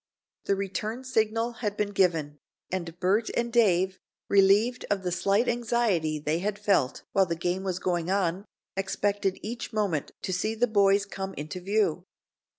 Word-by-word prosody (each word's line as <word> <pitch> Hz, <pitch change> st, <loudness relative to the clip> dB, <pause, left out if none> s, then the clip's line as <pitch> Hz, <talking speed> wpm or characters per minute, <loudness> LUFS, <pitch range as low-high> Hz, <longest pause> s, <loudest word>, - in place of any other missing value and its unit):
The 200 Hz, -, +2 dB
return 210 Hz, +5 st, -3 dB
signal 225 Hz, -2 st, 0 dB
had 210 Hz, -2 st, -2 dB
been 205 Hz, -1 st, 0 dB
given, 160 Hz, -7 st, +1 dB, 0.3 s
and 175 Hz, -2 st, -4 dB
Bert 200 Hz, +5 st, +2 dB
and 235 Hz, 0 st, -1 dB
Dave, 190 Hz, -5 st, +3 dB, 0.3 s
relieved 200 Hz, +5 st, +4 dB
of 200 Hz, -2 st, 0 dB
the 180 Hz, -, -1 dB
slight 200 Hz, +6 st, +2 dB
anxiety 225 Hz, -10 st, +1 dB
they 150 Hz, +2 st, -1 dB
had 205 Hz, +2 st, -2 dB
felt 200 Hz, -10 st, +1 dB
while 195 Hz, -1 st, +3 dB
the 170 Hz, -, -1 dB
game 175 Hz, +3 st, -2 dB
was 185 Hz, -2 st, -2 dB
going 175 Hz, -2 st, -1 dB
on, 190 Hz, 0 st, 0 dB, 0.3 s
expected 195 Hz, 0 st, -1 dB
each 240 Hz, +4 st, -5 dB
moment 200 Hz, -, -1 dB
to 185 Hz, -, -2 dB
see 215 Hz, +5 st, -1 dB
the 235 Hz, +2 st, +3 dB
boys 200 Hz, -3 st, +3 dB
come 195 Hz, 0 st, -6 dB
into 150 Hz, +5 st, -5 dB
view. 190 Hz, -2 st, 0 dB
195 Hz, 160 wpm, -27 LUFS, 180-215 Hz, 0.3 s, relieved